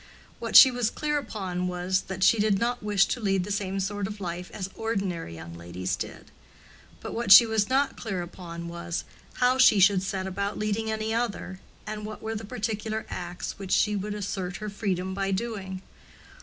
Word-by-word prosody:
What - - -4
she 260 - +11
was 245 -3 0
clear 295 -1 -1
upon 190 -8 -3
was, 180 +1 0
that 190 0 -3
she 225 - +5
did 210 -1 +3
not 240 +4 -1
wish 205 -2 +3
to - - -2
lead 195 -4 +1
the 205 - -5
same 195 -1 -2
sort 200 +1 -2
of 210 0 -7
life 180 -1 -5
as 190 -3 -4
ordinary 195 - -3
young 80 +1 -9
ladies 85 +2 -4
did; - - -8 0.7
but - - -6
what 235 -4 -1
she 215 +4 +12
was 220 -2 0
not 270 +2 +1
clear 195 -6 -3
upon 170 -1 -8
was, 170 0 -4 0.3
how 255 +1 +2
she 235 -5 +7
should 195 0 +5
set 190 0 -3
about 200 +2 -3
leading 215 +1 -1
any 220 0 -1
other, 225 -5 -2 0.3
and 215 0 -5
what 215 0 -7
were 220 0 -3
the 220 0 -5
particular 220 +1 -3
acts 175 +1 -5
which 195 -2 -7
she 210 -1 +3
would 205 +1 -3
assert 190 -3 -4
her 215 -1 -5
freedom 190 -3 -2
by 195 0 -1
doing. 190 -2 -3
200 Hz, 195 wpm, -27 LUFS, 185-220 Hz, 0.7 s, she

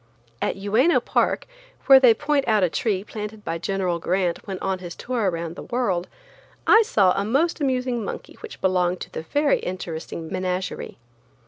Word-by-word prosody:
At - - 0
Uyeno 220 - +3
park, - - 0 0.4
where 270 -1 +9
they 245 -4 +6
point 290 0 0
out 215 -3 +3
a 175 - +2
tree 200 -4 -1
planted 210 0 -7
by 165 - -3
General 185 -1 -1
Grant 180 +1 -1
when 190 -2 -4
on 190 0 -2
his 175 -2 -8
tour 235 -5 -1
around 170 -1 -4
the - - -8
world, 195 -8 -1 0.6
I 450 - +7
saw 200 - +3
a 200 - 0
most 290 +10 +1
amusing 250 -3 0
monkey - - -6
which 455 - -10
belonged 180 -1 +1
to - - -7
the - - -5
very 290 - +1
interesting 165 -2 -5
menagerie. 185 0 -3
195 Hz, 175 wpm, -23 LUFS, 180-250 Hz, 0.6 s, where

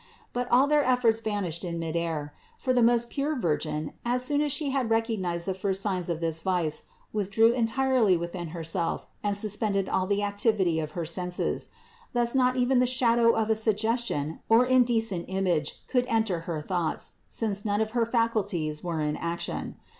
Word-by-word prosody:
But 245 0 -2
all 255 +3 +5
their 295 0 +3
efforts 245 -3 +3
vanished 200 -7 -3
in 170 -2 -3
midair; 165 -3 -3 0.2
for 255 - 0
the 250 - +3
most 235 0 +3
pure 290 +2 -1
Virgin, 155 - -2
as 250 +1 +1
soon 290 +2 +2
as 295 -1 +1
She 285 0 +1
had 265 -4 0
recognized 210 -7 0
the 190 - 0
first 190 0 -1
signs 185 -4 -2
of 170 -1 -2
this 165 -1 0
vice, 170 -3 -1 0.3
withdrew 215 +2 +3
entirely 240 -4 +2
within 170 +1 -5
Herself 165 +1 -3 0.2
and 205 -1 0
suspended 205 -1 0
all 185 0 0
the 205 +1 0
activity 200 -4 +1
of 155 -1 -4
her 170 - -2
senses. 180 +2 -2 0.4
Thus 240 -1 +1
not 255 -1 +3
even 250 +1 +3
the 250 - +3
shadow 235 -2 +4
of 220 0 +1
a - - +3
suggestion 220 - 0
or 230 +2 +6
indecent 230 -7 +2
image 185 -6 -1
could 250 -1 +1
enter 220 -7 +1
her 155 -3 -3
thoughts, 175 -2 -2 0.2
since 205 -3 -2
none 205 -1 0
of 220 0 -1
her 235 -1 +1
faculties 205 -10 0
were 170 -3 -2
in 150 0 -1
action. 170 0 -4
205 Hz, 175 wpm, -27 LUFS, 170-235 Hz, 0.4 s, or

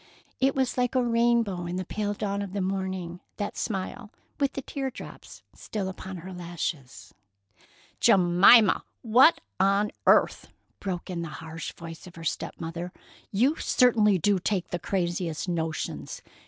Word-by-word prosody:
It 270 +1 +2
was 260 -1 0
like 245 +1 0
a 255 - +3
rainbow 230 -6 +2
in 175 - -3
the 185 0 -3
pale 205 +2 -2
dawn 200 -1 -2
of 195 -2 -6
the 205 - -2
morning, 185 -2 -3 0.2
that 205 -1 -3
smile, 215 +2 -4 0.3
with 280 -1 +1
the 275 - -5
tear 270 0 -3
drops - - -11
still 205 -3 -4
upon 190 0 -7
her 185 +3 -8
lashes. 170 -6 -5 0.9
"Jemima, 195 +1 +6 0.2
what 250 +7 +6 0.2
on 200 +2 +3 0.2
earth!" - - +4 0.3
broke 185 -1 -4
in 170 -1 -3
the 170 - -4
harsh 160 +1 -7
voice 165 +1 -10
of 175 - -13
her 165 - -9
step 165 - -3
mother. 170 +2 -5 0.4
"You 255 +10 +2
certainly 220 -6 +4
do 195 +2 +2
take 185 0 -1
the 175 - -3
craziest 175 -2 -2
notions! 160 -3 -3
190 Hz, 155 wpm, -27 LUFS, 175-225 Hz, 0.9 s, Jemima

